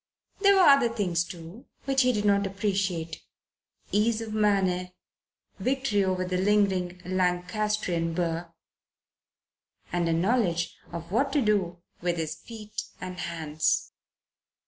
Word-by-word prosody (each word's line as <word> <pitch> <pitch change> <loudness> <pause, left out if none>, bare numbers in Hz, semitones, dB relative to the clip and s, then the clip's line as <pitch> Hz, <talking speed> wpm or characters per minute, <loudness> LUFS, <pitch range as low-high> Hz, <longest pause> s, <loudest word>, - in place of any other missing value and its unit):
There 400 0 +6
were 385 - +5
other 275 -6 +6
things, 185 -7 0
too, 175 +6 -10 0.2
which 270 -1 +3
he 250 -1 +4
did 210 -3 -1
not 200 -1 +3
appreciate 190 -5 -2 0.7
ease 215 +3 +2
of 225 -1 -5
manner, 195 -4 +2 0.7
victory 260 -6 +1
over 185 -1 0
the 180 0 -1
lingering 190 -3 +2
Lancastrian 180 -1 0
burr, 170 -1 -2 1.4
and 175 -1 +1
a - - +2
knowledge 175 -2 +1 0.2
of 170 0 -7
what 270 +6 +1
to 290 - +3
do 180 -5 0 0.2
with 175 0 0
his 160 -2 -2
feet 215 -2 -7 0.2
and 180 0 -6
hands. 160 -3 -1
190 Hz, 125 wpm, -27 LUFS, 175-215 Hz, 1.4 s, There